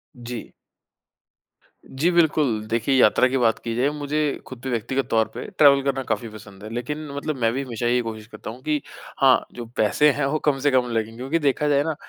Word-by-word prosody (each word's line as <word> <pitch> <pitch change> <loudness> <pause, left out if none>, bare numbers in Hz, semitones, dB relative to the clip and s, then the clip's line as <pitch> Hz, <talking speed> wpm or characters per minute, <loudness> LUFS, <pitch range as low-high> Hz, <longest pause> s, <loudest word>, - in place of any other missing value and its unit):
जी। 120 -2 -8 1.4
जी 145 +6 0
बिल्कुल। 150 -10 +2
देखिए 115 +4 +1
यात्रा 125 0 +5
की 130 +1 -1
बात 115 -3 +2
की 115 - -4
जाए 130 +4 +2
मुझे 150 0 -3 0.3
खुद 130 - -9
भी 130 - -3
व्यक्तिगत 130 +3 -1
तौर 110 -1 +2
पे - - -6
ट्रेवल 140 -2 +6
करना 135 -1 -1
काफ़ी 120 - -1
पसंद 100 -2 -13
है 110 - -7
लेकिन 150 +6 -4
मतलब 145 +2 -3
मैं 115 0 +3
भी 135 - -2
हमेशा 120 -2 -3
यही 125 +1 +2
कोशिश 110 -2 -7
करता - - -9
हूँ 120 +3 -9
कि 150 -1 0 0.4
हाँ, 135 -1 +5
जो 120 - -7
पैसे 110 +8 +4
हैं 145 0 -1
वो 150 +3 0
कम 145 -3 +2
से 145 +2 +2
कम 125 -2 +2
लगें 115 0 -2
क्योंकि 135 +7 -1
देखा 145 0 +1
जाए 145 -1 +3
ना 160 0 -2
130 Hz, 215 wpm, -23 LUFS, 115-145 Hz, 1.4 s, ट्रेवल